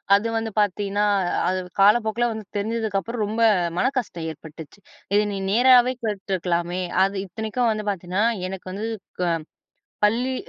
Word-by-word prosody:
அது 205 +3 +1
வந்து 225 -1 -3
பார்த்தீங்கன்னா 205 +1 +1 0.4
அது 185 +1 0 0.2
காலப்போக்குல 220 +3 +4
வந்து 220 -2 -6
தெரிஞ்சதுக்கு 220 -1 -1
அப்புறம், 230 0 -3
ரொம்ப 220 +3 -2 0.4
மனக்கஷ்டம் 245 -9 -1
ஏற்பட்டுச்சி. 160 +4 -12 0.3
இத 205 - +5
நீ 195 - -3
நேராவே 250 +2 +6
கேட்டுருக்கலாமே. 185 -4 -1 0.2
அது 195 +1 0
இத்தனைக்கும் 220 +5 -1
வந்து 215 -1 -3
பார்த்தீங்கன்னா, 190 +2 -1 0.2
எனக்கு 190 0 -8
வந்து 210 +4 -4 1.2
பள்ளி 250 +5 0
210 Hz, 125 wpm, -23 LUFS, 190-230 Hz, 1.2 s, நேராவே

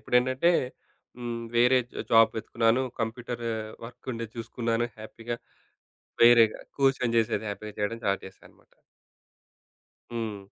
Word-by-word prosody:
ఇప్పుడేంటంటే, 130 +8 +3 0.7
హ్మ్. 120 -1 -4
వేరే 125 +2 +6 0.3
జాబ్ 115 -1 +6
వెతుకున్నాను. 115 +2 +1 0.2
కంప్యూటరు 115 +1 -3 0.3
వర్క్ 120 +2 -11
ఉండేది 115 -1 -6
చూసుకున్నాను. 115 0 -1
హ్యాపీగా 115 +2 -6 0.9
వేరేగా, 115 -2 +7 0.2
కూర్చొని 135 -3 +2
జేసేది 110 -1 0
హ్యాపీగా 105 +1 -7
చేయడం 105 +3 -2
స్టార్ట్ 100 -1 0
చేశానన్నమాట. 95 - -18 1.4
హ్మ్. 110 -4 -4
115 Hz, 100 wpm, -27 LUFS, 110-120 Hz, 1.4 s, వేరేగా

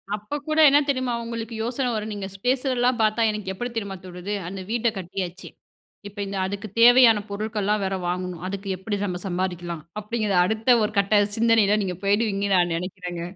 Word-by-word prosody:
அப்ப 210 +7 -6
கூட 310 +1 +1
என்ன 285 - +5
தெரியுமா, 255 -3 0
உங்களுக்கு 230 0 -5
யோசன 250 +2 -1
வரும்? 215 0 -3
நீங்க 200 -2 -5
ஸ் - - -11
பேசுறதலாம் 250 -2 +1
பார்த்தா 215 +1 +2
எனக்கு 210 -3 -4
எப்படி 245 +6 -4
தெரியுமா 200 -4 -3
தோணுது? 180 +3 -6
"அந்த 190 +1 -6
வீட்ட 235 0 +1
கட்டியாச்சு, 180 0 -5 0.6
இப்ப 205 - -14
இந்த 195 0 -4
அதுக்கு 200 +2 -5
தேவையான 235 -3 +7
பொருட்கள்லாம் 210 0 -1
வேற 190 0 -1
வாங்கணும். 180 -1 -3
அதுக்கு 200 0 -5
எப்படி 200 +2 -3
நம்ம 180 -2 -4
சம்பாதிக்கலாம்?" 175 -3 -3 0.2
அப்படிங்கிற 210 -2 -1
அடுத்த 220 +4 +3
ஒரு 210 0 -1
கட்ட 205 +1 +3
சிந்தனையில 220 -2 +4
நீங்க 180 -2 -3
போயிடுவீங்கன்னு 200 -1 +1
நான் 175 -1 +2
நினைக்கிறங்க. 180 -1 -6
205 Hz, 170 wpm, -24 LUFS, 190-230 Hz, 0.6 s, தேவையான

